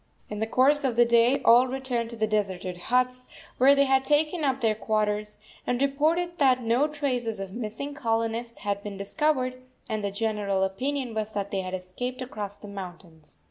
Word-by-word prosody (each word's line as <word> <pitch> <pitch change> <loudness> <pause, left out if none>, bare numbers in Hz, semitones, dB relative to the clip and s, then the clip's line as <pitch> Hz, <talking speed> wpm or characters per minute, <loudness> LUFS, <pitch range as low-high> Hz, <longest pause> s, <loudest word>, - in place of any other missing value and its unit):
In 210 - -4
the 220 - -1
course 280 +5 +3
of 255 -4 0
the 240 +1 +5
day 235 +3 +3
all 245 +2 +7
returned 250 -3 -2
to 235 - -7
the 220 -1 +1
deserted 190 -4 -1
huts, 250 +6 0 0.3
where 275 +3 +7
they 280 - +4
had 265 -1 +3
taken 305 +4 +1
up 270 -2 +1
their 225 -4 +2
quarters, 210 -1 -1 0.3
and 245 0 0
reported 315 +6 +1
that 255 -3 +4
no 240 +6 +2
traces 255 -8 -2
of 195 -1 -6
the 235 - -6
missing 240 +6 -4
colonists 230 -2 -2
had 200 0 -2
been 205 -1 -7
discovered, 255 +4 -1 0.3
and 215 -3 -3
the 200 - 0
general 200 -2 -1
opinion 255 +6 -2
was 215 0 -3
that 200 -1 -3
they 195 - -1
had 185 0 -4
escaped 245 +8 -5
across 210 -5 -6
the 205 - -12
mountains. 175 - -9
230 Hz, 190 wpm, -26 LUFS, 205-265 Hz, 0.3 s, all